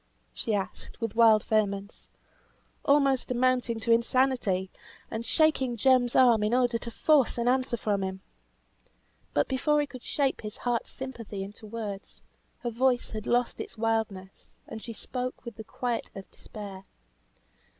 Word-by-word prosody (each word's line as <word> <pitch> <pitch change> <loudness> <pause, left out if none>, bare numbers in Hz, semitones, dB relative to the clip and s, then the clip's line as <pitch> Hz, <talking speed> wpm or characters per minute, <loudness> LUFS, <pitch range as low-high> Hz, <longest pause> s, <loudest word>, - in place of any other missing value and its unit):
she 220 - -1
asked 195 -2 -4
with 225 -3 -2
wild 225 -2 +6
vehemence, 200 -2 -1 0.7
almost 275 -2 +3
amounting 250 -2 +1
to 225 +1 -1
insanity, 230 -5 +2 0.4
and 225 +1 -4
shaking 270 -6 +2
Jem's 250 0 +3
arm 240 -4 +6
in 210 +3 +2
order 245 -2 +2
to 235 - -7
force 275 +2 +3
an 235 0 0
answer 255 -1 +2
from 205 -2 0
him. 190 0 -4 1.1
But 145 - +3
before 295 +3 +2
he 295 - +2
could 255 -3 -11
shape 275 +1 0
his 210 -1 -6
heart's 240 -2 -1
sympathy 230 -7 -6
into 205 +2 -10
words, 210 -3 -7 0.4
her 240 - -1
voice 245 +1 +1
had 215 0 -5
lost 245 0 +1
its - - -6
wildness, 220 -4 -3
and 220 - -7
she 235 - -7
spoke 250 +4 -5
with 235 -2 -7
the 220 - -7
quiet 240 +2 -3
of 195 -1 -9
despair. 195 -3 -9
230 Hz, 150 wpm, -28 LUFS, 210-255 Hz, 1.1 s, wild